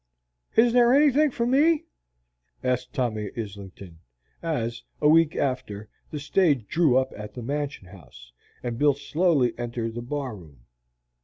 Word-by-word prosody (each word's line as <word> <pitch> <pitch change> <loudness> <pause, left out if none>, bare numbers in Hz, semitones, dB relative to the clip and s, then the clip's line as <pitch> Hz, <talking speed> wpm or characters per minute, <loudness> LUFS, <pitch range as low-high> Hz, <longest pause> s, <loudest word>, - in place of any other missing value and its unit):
"Is 230 +1 +5
there 245 +1 +5
anything 295 +1 +4
for 235 -2 -2
me?" 295 +6 +3 0.8
asked 125 0 -1
Tommy 110 -5 -2
Islington, 100 -5 -8 0.4
as, 120 -8 -2 0.2
a 150 - +3
week 160 0 +4
after, 125 -6 -3 0.2
the 150 - -5
stage 145 - +1
drew 155 -7 +3
up 130 0 0
at 105 0 -9
the 125 - -6
Mansion 140 -3 -4
House, 65 -10 -15 0.3
and 120 -1 -4
Bill 145 -1 +4
slowly 145 -3 +1
entered 120 -1 -3
the 120 - -5
bar 130 -1 -4
room. 75 -9 -15
130 Hz, 145 wpm, -25 LUFS, 110-165 Hz, 0.8 s, Is